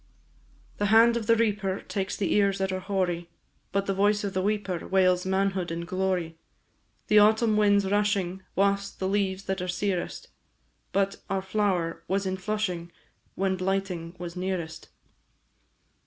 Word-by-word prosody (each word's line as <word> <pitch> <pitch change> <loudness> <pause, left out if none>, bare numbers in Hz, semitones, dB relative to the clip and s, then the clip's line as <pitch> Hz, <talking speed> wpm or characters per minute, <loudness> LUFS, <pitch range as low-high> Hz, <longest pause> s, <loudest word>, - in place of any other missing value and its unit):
The 205 - +1
hand 225 +3 +6
of 225 -3 -3
the 230 - +6
reaper 205 -4 0
Takes 195 -1 -3
the 195 - 0
ears 200 -1 +3
that 190 -1 -1
are 185 - -2
hoary, 180 -3 -2 0.4
But 200 +1 0
the 195 - 0
voice 205 +2 +2
of 200 -2 -3
the 185 - 0
weeper 200 -3 -2
Wails 185 -1 +3
manhood 190 -1 0
in 165 +1 -4
glory. 180 -3 -2 0.7
The 210 - +5
autumn 220 +1 +4
winds 205 -1 +4
rushing 195 -2 0
Wafts 200 0 +2
the 190 - -4
leaves 195 -1 0
that 190 -2 -2
are 180 - -3
searest, 180 0 -2 0.6
But 195 0 +1
our 195 -1 -1
flower 185 -5 -1
was 195 +2 0
in 190 0 -1
flushing 185 -4 -3 0.4
When 190 0 0
blighting 185 -2 -2
was 175 -1 -7
nearest. 180 -3 -4
190 Hz, 155 wpm, -27 LUFS, 185-205 Hz, 0.7 s, hand